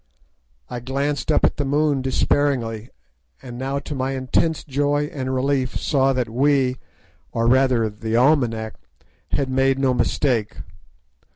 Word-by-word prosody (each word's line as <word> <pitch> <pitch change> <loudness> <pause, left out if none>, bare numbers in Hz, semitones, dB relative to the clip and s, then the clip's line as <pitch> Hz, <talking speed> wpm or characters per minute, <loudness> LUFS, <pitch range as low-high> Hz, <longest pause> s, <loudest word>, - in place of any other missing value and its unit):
I 125 - -5
glanced 140 +5 -2
up - - +4
at - - 0
the 145 - 0
moon 145 0 +1
despairingly, 130 -4 0 0.5
and 125 -2 -9
now 135 +3 -3
to 145 - -5
my 135 0 -2
intense 135 +5 0
joy 145 +1 0
and 130 -2 -3
relief 130 0 0
saw 135 -1 +2
that 125 -2 -1
we—or 130 -2 -2
rather 125 -2 +3
the 110 +1 -4
almanack—had 125 0 -1
made 135 +1 +2
no 135 -1 +2
mistake. 120 -3 0
130 Hz, 125 wpm, -22 LUFS, 125-140 Hz, 0.5 s, up